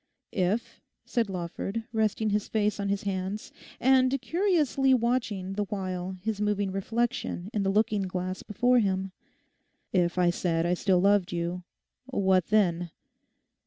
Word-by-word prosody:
'If,' 205 +5 -1 0.2
said 230 -5 0
Lawford, 190 +4 -4
resting 220 -1 +1
his 210 0 0
face 210 -1 0
on 200 0 -1
his 200 0 -1
hands, 195 +1 -3 0.3
and 260 +1 +4
curiously 295 -4 +2
watching 230 -6 -1
the 205 +1 -1
while 185 -2 -4
his 215 -1 -2
moving 205 -2 0
reflection 225 -1 -2
in 210 - 0
the 195 - +1
looking 210 +1 +2
glass 185 0 -3
before 245 +4 +2
him—'if 190 -2 -3
I 175 -1 +4
said 170 -1 0
I 175 - +2
still 185 0 +2
loved 200 -1 +3
you, 175 +1 -2 0.4
what 190 -8 +2
then? 175 -5 +2
200 Hz, 135 wpm, -28 LUFS, 185-225 Hz, 0.4 s, and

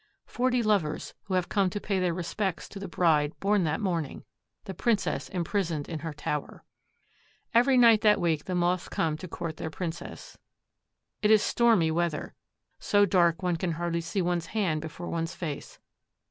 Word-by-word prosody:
Forty 250 -1 0
lovers, 195 -8 0
who 190 - -2
have 180 -1 +1
come 195 -3 +1
to 205 - -4
pay 195 -2 -1
their 180 -1 +1
respects 175 +2 -3
to 200 - -8
the 195 - -5
bride 160 -4 +1
born 200 -2 +2
that 155 0 0
morning—the 180 +1 -5
princess 225 +1 0
imprisoned 170 -4 -2
in 165 -2 -4
her 165 +1 -5
tower! 150 0 -4 0.9
Every 250 +3 +5
night 230 -3 +6
that 210 -2 +5
week 165 -4 0
the 185 - -2
Moths 175 0 0
come 160 -2 0
to 185 - -8
court 165 -2 -5
their 160 - -4
princess. 165 +1 -7 0.8
It 210 - +3
is 215 -1 +6
stormy 225 -9 +3
weather, 170 -2 -1 0.5
so 205 0 +3
dark 175 -3 +2
one 175 -2 +1
can 170 0 -1
hardly 170 +1 -2
see 180 +3 -2
one's 175 -1 -1
hand 180 -8 0
before 160 +2 -7
one's 165 +1 -3
face. 160 -6 -6
175 Hz, 170 wpm, -28 LUFS, 165-200 Hz, 0.9 s, night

